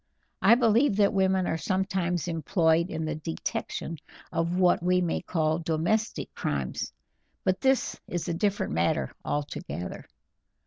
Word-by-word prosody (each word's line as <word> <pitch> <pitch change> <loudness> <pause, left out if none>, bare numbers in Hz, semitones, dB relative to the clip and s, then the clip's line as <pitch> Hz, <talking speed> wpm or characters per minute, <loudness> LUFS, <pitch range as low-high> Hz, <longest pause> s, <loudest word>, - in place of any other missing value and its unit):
I 230 - +7
believe 235 0 +3
that 205 0 +3
women 190 -1 +2
are 160 - -1
sometimes 185 -2 0
employed 165 0 +2
in 160 -2 -3
the 155 - -1
detection 160 +1 -4 0.3
of 170 +2 0
what 180 -2 +4
we 180 +1 +3
may 175 -2 0
call 160 -1 0
domestic 170 +7 -1
crimes, 70 -3 -2 0.5
but 185 0 +1
this 265 -1 +1
is 175 0 -3
a 170 - 0
different 200 - 0
matter 85 +2 +1
altogether." 145 -11 -4
175 Hz, 135 wpm, -28 LUFS, 160-190 Hz, 0.5 s, I